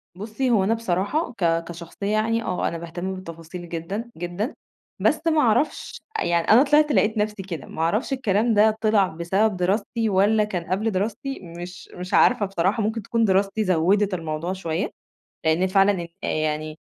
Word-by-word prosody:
بصي 220 +7 -2
هو 220 -5 +3
أنا 210 +4 +2
بصراحة 230 - -1
ك 165 -5 +1
كشخصية 170 +3 -7
يعني 225 +2 +1
آه 180 - -1
أنا 170 - -3
باهتم 175 +3 -5
بالتفاصيل 170 -1 -9
جدًا، 190 +8 -4
جدًا. 175 - -3 0.4
بس 305 - +2
ما 315 -2 +4
اعرفش 250 +5 0 0.2
أ - - 0
يعني 170 -1 +1
أنا 235 +5 +7
طلعت 300 +1 +4
لقيت 220 -4 +2
نفسي 210 -1 -1
كده، 170 -7 -6
ما - - -6
اعرفش 210 - 0
الكلام 225 -3 +1
ده 215 +1 +4
طلع 215 -3 +3
بسبب 185 +5 0
دراستي؟ 205 +5 0
والّا 205 +3 +3
كان 185 -5 -3
قبل 215 +4 +1
دراستي؟ 220 +8 -3
مش 175 +1 -9
مش 180 0 -7
عارفة 245 -4 +4
بصراحة. 195 +3 0
ممكن 220 +2 -1
تكون 230 +2 +1
دراستي 195 +2 +2
زوّدت 190 +2 +2
الموضوع 165 +1 -3
شوية، 175 0 -2 0.6
لأن 160 +4 +3
فعلًا 195 -2 +2 0.2
يعني 155 0 -2
195 Hz, 165 wpm, -23 LUFS, 175-220 Hz, 0.6 s, أنا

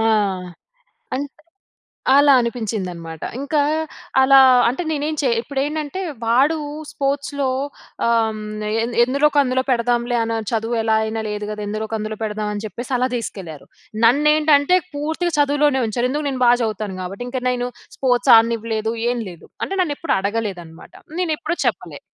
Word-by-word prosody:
ఆ! - - +1 1.1
అన్ 275 +2 -2 0.9
అలా 285 0 +6
అనిపించిందనమాట. 190 -9 -4 0.2
ఇంకా 290 +2 0 0.6
అలా 270 +1 +7 0.3
అంటే, 255 +8 0
నేనేం 305 0 -1
చే 265 - +2
ఇప్పుడేంటంటే, 290 +6 -3 0.2
వాడు 265 +8 +3 0.3
స్పోర్ట్స్‌లో 280 -1 -1 0.6
ఆహ్, 225 -2 +1 0.4
ఎ - - +1 0.2
ఎందులోక 280 +3 +1
అందులో 260 0 0
పెడదాంలే, 240 0 +1
అని 225 0 -1
చదువు 230 +1 -1
ఎలా 220 0 +2
అయినా 220 0 -3
లేదు 210 0 -4
కదా! 210 0 -5
ఎందులోక 215 +1 -4
అందులో 215 0 -5
పెడదాం, 210 -1 -2
అని 205 - -5
చెప్పేసి 240 +6 -7
అలా 255 - +1
తీసుకెళ్లారు. 180 -9 -7 0.4
నన్నేంటంటే, 300 +4 +4 0.2
పూర్తిగా 320 +4 -2
చదువులోనే 290 -1 +3
ఉంచారు. 240 +3 -1
ఎందుకు? 295 +1 -2
నేను 260 -2 -2
బాగా 240 0 +5
చదువుతాను 215 -3 -3
కాబట్టి. 195 +6 -6
ఇంకా 255 +1 -3
నేను 245 0 -1 0.3
స్పోర్ట్స్ 245 -2 +3
ఆడనివ్వలేదు, 225 -1 +1 0.2
ఏం 245 - -2
లేదు. 170 - -14 0.2
అంటే, 390 - -4
నన్ను 305 -5 -1
ఎప్పుడు 335 - 0
అడగలేదనమాట. 195 -5 -5 0.3
నేను 335 -4 +1
ఎప్పుడూ 345 +2 -3
చెప్పలే. - - -3
245 Hz, 140 wpm, -20 LUFS, 220-285 Hz, 1.1 s, అలా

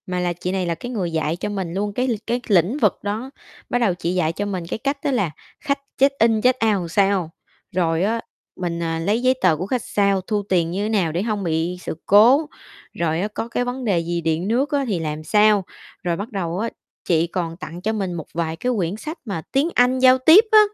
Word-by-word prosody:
Mà 180 -1 -2
là 175 -1 0
chị 180 +1 -4
này 190 -1 -1
là 170 -1 -1
cái 245 - -7
người 190 -8 -2
dạy 160 0 -1
cho 185 - -4
mình 190 -5 -4
luôn 205 +2 -2
cái 250 +4 0
l 245 - +1
cái 240 +1 0
lĩnh 200 - +3
vực 215 -9 +2
đó, 215 +5 -3 0.4
bắt 245 - +1
đầu 220 -6 +2
chị 175 0 -3
dạy 165 -3 +1
cho 205 - -3
mình 190 -4 -3
cái - - -3
cách 275 +3 -1
đó 285 - +1
là 200 - 0 0.3
khách 280 0 -1 0.2
check 275 +1 +5
in, 225 -1 +3
check 255 +2 +4
out - - -29 0.2
làm 170 - -5
sao. 195 -2 +2 0.5
Rồi 165 -1 +1
á, 225 +3 0 0.3
mình, 170 -2 -3
à, 165 0 -2
lấy 205 +8 0
giấy 255 +1 +4
tờ 180 -4 +4
của 180 - -3
khách 245 +3 -2
sao, 200 -2 +1
thu 205 +2 -2
tiền 170 -3 +2
như 195 +3 -2
thế - - -2
nào 195 -7 +1
để 170 +3 -1
hông 210 -3 -2
bị 165 +1 -1
sự - - -5
cố, 250 +10 +6 0.4
rồi 165 0 -1
á, 205 - 0
có 215 +2 -5
cái 245 +1 -2
vấn 250 +1 -4
đề 195 -6 +2
gì 170 +1 -2
điện 165 +3 -1
nước 260 +7 +1
á 285 -2 +1
thì 195 -6 -1
làm 155 -1 -4
sao, 210 +2 +4 0.4
rồi 170 -1 0
bắt 205 +6 -5
đầu 180 -3 -3
á 230 +2 -1 0.4
chị 165 -1 +2
còn 165 -1 -4
tặng 175 0 -8
cho 220 +4 -1
mình 195 -4 -2
một 165 -3 -5
vài 165 -1 -2
cái 250 +9 -1
quyển 180 0 -1
sách 310 +8 -6
mà 195 -7 -3
tiếng 280 +5 +2
Anh 250 +1 +3
giao 255 0 +6
tiếp 320 - +7
á 435 - +9
195 Hz, 250 wpm, -21 LUFS, 170-235 Hz, 0.5 s, á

